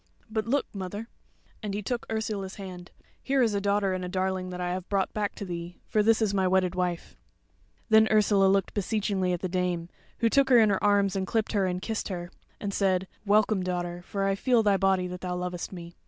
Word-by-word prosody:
But 220 0 -1
look, 280 +4 +1
mother," 205 +3 -5 0.5
and 205 -2 -3
he 210 - -3
took 240 +3 -3
Ursula's 210 -3 -3
hand, 180 -3 -8 0.3
"here 270 -1 +2
is 225 -3 +2
a 200 - 0
daughter 200 -1 +1
and 185 0 -3
a 180 - -4
darling 185 0 -1
that 180 0 -6
I 180 0 -1
have 185 0 -5
brought 195 -2 0
back 210 -1 -2
to 200 - -6
thee, 175 -1 -6
for 215 - +1
this 225 +1 +3
is 205 -2 +1
my 190 -2 +2
wedded 185 -1 +2
wife." 180 -2 -2 0.7
Then 220 0 +6
Ursula 205 -2 +4
looked 195 0 +2
beseechingly 200 -2 0
at 175 - -2
the 185 - -1
Dame, 180 -2 -1 0.3
who 230 - +2
took 270 +3 +3
her 250 - +7
in 220 -3 +5
her 195 - 0
arms 200 -1 +3
and 190 -1 -1
clipped 220 -2 0
her 200 -3 +1
and 180 0 -3
kissed 220 -1 -2
her; 175 -3 -5 0.3
and 200 -1 -3
said, 190 -2 +1 0.2
"Welcome, 210 -1 +3
daughter; 175 -1 -3
for 195 +2 -3
I 195 - +2
feel 235 +3 +2
thy 205 -2 +4
body 190 -1 +2
that 180 0 -6
thou 180 -1 -3
lovest 180 -1 -4
me." 170 -2 -9
195 Hz, 225 wpm, -28 LUFS, 180-210 Hz, 0.7 s, her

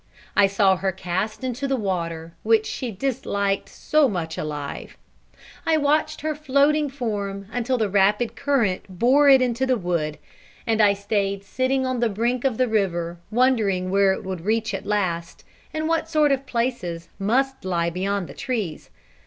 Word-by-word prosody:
I 200 -1 +6
saw 195 -1 +3
her 190 +1 0
cast 190 +5 -3
into 255 +2 -2
the 270 - +1
water, 170 -6 -3
which 220 0 +3
she 255 - -4
disliked 200 -4 -1
so 305 -2 +2
much 165 -5 -3
alive; 150 -2 -5 0.7
I 320 -1 +2
watched 305 +1 +1
her 310 +1 -1
floating 295 +1 +2
form 205 -7 -4
until 245 +2 0
the 220 -3 +1
rapid 210 +4 +2
current 250 -10 +1 0.2
bore 275 +7 +5
it 265 -2 +7
into 250 +1 0
the 255 -1 +2
wood, 170 -6 -2 0.5
and 225 -2 +2
I 200 -1 +5
stayed 200 -1 -1
sitting 260 +5 0
on 255 -1 -1
the 235 -1 +2
brink 235 +4 -1
of 255 -5 +1
the 255 - +2
river 175 -6 -1
wondering 215 -6 +2
where 195 0 +4
it 190 - -3
would 185 -3 -5
reach 220 +4 0
at - - -5
last, 180 -5 -2 0.3
and 310 0 -2
what 325 0 0
sort 305 -3 +3
of 275 0 -1
places 205 -9 -2
must 265 +7 0
lie 170 -2 0
beyond 190 +1 -2
the - - -10
trees. 215 - -4
215 Hz, 170 wpm, -23 LUFS, 190-260 Hz, 0.7 s, it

